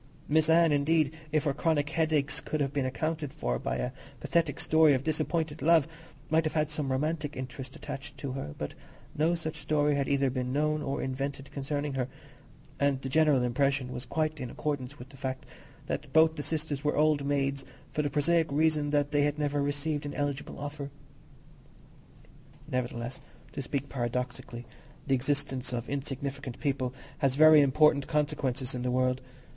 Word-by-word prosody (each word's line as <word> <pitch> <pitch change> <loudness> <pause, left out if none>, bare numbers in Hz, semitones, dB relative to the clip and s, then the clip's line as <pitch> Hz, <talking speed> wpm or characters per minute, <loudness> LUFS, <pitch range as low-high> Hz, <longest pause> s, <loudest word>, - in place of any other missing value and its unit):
Miss 155 +1 +3
Anne, 165 0 +6
indeed, 150 +1 +2 0.2
if 155 -1 +2
her 145 -3 +1
chronic 150 -1 +1
headaches 155 -3 +1
could 155 - -3
have 140 -1 0
been 140 -3 0
accounted 155 +1 -2
for - - -2
by - - -2
a 60 0 -2 0.3
pathetic 160 -3 0
story 160 -2 +5
of 130 - -2
disappointed 155 0 -1
love, 165 -3 +5 0.4
might 160 +1 +4
have 155 - -2
had 155 -1 +1
some 150 -3 -2
romantic 150 +2 -1
interest 130 0 -6
attached 135 +2 -7
to 140 -3 -4
her: 130 - -5
but - - -4 0.4
no 160 +3 +2
such 160 -1 -4
story 150 0 +2
had 140 -1 0
either 140 -2 +2
been 125 -1 -2
known 150 +2 +1
or 140 -1 -2
invented 135 +1 -4
concerning 145 +1 -2
her, 130 -2 -1 0.7
and 140 -1 +2
the 135 - -3
general 150 -3 +4
impression 135 +1 +1
was 125 0 -6
quite 155 +2 -1
in 125 -2 -4
accordance 145 -1 -3
with 125 +1 -11
the 135 - -14
fact, 130 0 -4 0.4
that 145 -2 -4
both 160 +1 +5
the 150 - -3
sisters 150 -2 -2
were 150 - +1
old 150 -1 +3
maids 140 -1 0 0.3
for 150 - 0
the 145 - 0
prosaic 160 +2 +2
reason 150 0 +2
that 145 0 +1
they 145 -1 +3
had 145 +1 +1
never 145 -1 0
received 145 +1 -1
an 145 - -6
eligible 145 0 -3
offer. 145 0 -5 1.8
Nevertheless, 120 0 -3 0.3
to 145 - -4
speak 140 +1 -3
paradoxically, 125 -1 -3 0.4
the 135 - +1
existence 135 0 0
of 120 -1 -3
insignificant 140 -2 -4
people 135 -4 0 0.3
has 135 -3 +2
very 155 0 +8
important 140 0 +4
consequences 135 -4 0
in 125 - -3
the 125 - -1
world. 130 0 +1
145 Hz, 175 wpm, -30 LUFS, 135-155 Hz, 1.8 s, very